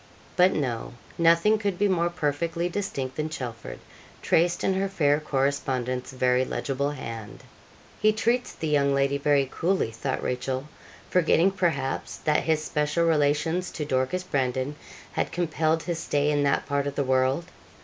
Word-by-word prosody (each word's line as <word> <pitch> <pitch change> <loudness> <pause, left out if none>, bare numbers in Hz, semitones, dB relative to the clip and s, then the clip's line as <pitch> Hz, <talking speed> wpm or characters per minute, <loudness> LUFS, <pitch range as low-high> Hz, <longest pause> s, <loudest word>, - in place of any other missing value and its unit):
But 185 +1 +5
no. 120 -6 -2 0.3
Nothing 170 +6 +4
could 200 -4 -1
be 205 - +3
more 175 -3 +1
perfectly 170 +1 -1
distinct 170 -9 -4
than 155 0 -1
'Chelford,' 125 -7 -6 0.5
traced 175 +1 +2
in 190 - +2
her 195 +1 0
fair 145 -6 +2
correspondent's 130 -3 -1
very 130 0 +2
legible 140 +2 -2
hand. 115 -7 -7 0.6
'He 215 - +5
treats 235 +3 0
the 160 - -5
young 140 -2 +2
lady 140 +1 +1
very 140 -1 +3
coolly,' 180 -9 0
thought 130 +4 -3
Rachel, 130 +2 -2 0.4
forgetting, 180 +1 +4
perhaps, 165 -9 -1
that 150 0 +1
his 160 -1 +1
special 150 +2 0
relations 160 +3 +1
to 150 - -5
Dorcas 130 +6 0
Brandon 130 -3 -1 0.4
had - - -1
compelled 160 -2 0
his 170 -2 -3
stay 145 -1 +1
in 145 -1 +1
that 140 -1 +1
part 140 0 -1
of 140 - -4
the 140 - +1
world. 130 +4 +1
150 Hz, 155 wpm, -26 LUFS, 135-170 Hz, 0.6 s, But